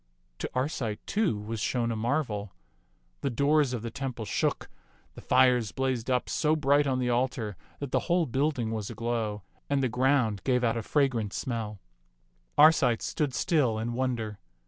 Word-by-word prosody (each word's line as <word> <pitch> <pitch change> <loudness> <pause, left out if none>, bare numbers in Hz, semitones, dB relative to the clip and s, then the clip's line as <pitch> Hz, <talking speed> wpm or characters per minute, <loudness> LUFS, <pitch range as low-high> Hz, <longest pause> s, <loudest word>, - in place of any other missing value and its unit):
To - - -3
Arcite, 125 -5 -2
too, 200 - +1
was 110 +2 -5
shown 120 +2 0
a - - -1
marvel. 110 -4 -1 0.7
The - - 0
doors 140 +2 +2
of 120 -3 -3
the 115 - -4
temple 130 -3 -4
shook, 100 - -1 0.5
the - - -11
fires 125 -4 +3
blazed 130 -3 -1
up 125 -1 +1
so 155 0 +1
bright 145 -1 +3
on 130 -1 +1
the 125 -1 0
altar 120 -4 -1 0.2
that 140 -3 -6
the - - +3
whole 175 -1 +3
building 130 -3 0
was 110 -3 -3
aglow, 110 -3 -2 0.3
and 140 -1 +1
the 130 - +2
ground 125 -4 +2
gave 125 -2 +1
out 115 -1 +2
a 115 - -1
fra 140 +5 +2
grant 115 -6 -3
smell. 110 -5 -3 0.8
Arcite 140 -7 +5
stood 145 -4 -1
still 140 -11 +2
in 115 +2 -2
wonder. 120 -5 -2
125 Hz, 170 wpm, -28 LUFS, 110-140 Hz, 0.8 s, Arcite